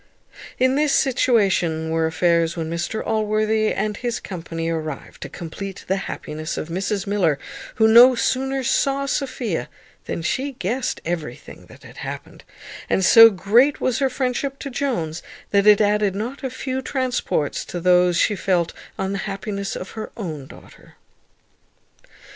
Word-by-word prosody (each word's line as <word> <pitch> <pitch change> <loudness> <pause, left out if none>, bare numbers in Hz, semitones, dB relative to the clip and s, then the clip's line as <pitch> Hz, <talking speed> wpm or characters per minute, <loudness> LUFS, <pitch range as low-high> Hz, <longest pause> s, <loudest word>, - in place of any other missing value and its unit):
In 260 +1 +3
this 295 +1 +2
situation 195 - +2
were 160 0 +1
affairs 170 0 +1
when 160 -1 -3
Mr 175 +6 -3
Allworthy 215 0 +1
and 210 +1 -1
his 240 -2 -3
company 165 -3 -5
arrived 155 -3 -5
to - - -6
complete 190 +3 -7
the 190 - +1
happiness 155 0 -5
of 155 - -4
Mrs 195 +3 -2
Miller, 185 -8 +1 0.4
who 220 0 +4
no 240 +3 +8
sooner 265 +2 0
saw 275 +2 +1
Sophia 255 - -2 0.4
than 165 - -4
she 270 - -1
guessed 245 +4 -2
everything 160 -7 -6
that - - -16
had - - -14
happened; - - -8 0.5
and 190 - +2
so 225 +4 +9
great 225 - +3
was 255 -3 0
her 270 -1 +2
friendship 260 +1 -2
to 275 - -7
Jones, 175 - -2 0.3
that 200 0 +3
it 210 -1 +7
added 210 -2 +2
not 245 +7 -5
a 265 - -1
few 260 +1 -4
transports 255 - -1
to 175 - -5
those 180 0 +4
she 210 - +2
felt 180 -4 0 0.2
on 195 0 -2
the 200 - -2
happiness 200 0 -4
of 185 - -7
her 220 -1 -7
own 155 - -6
daughter. - - -16
205 Hz, 155 wpm, -22 LUFS, 170-250 Hz, 0.5 s, so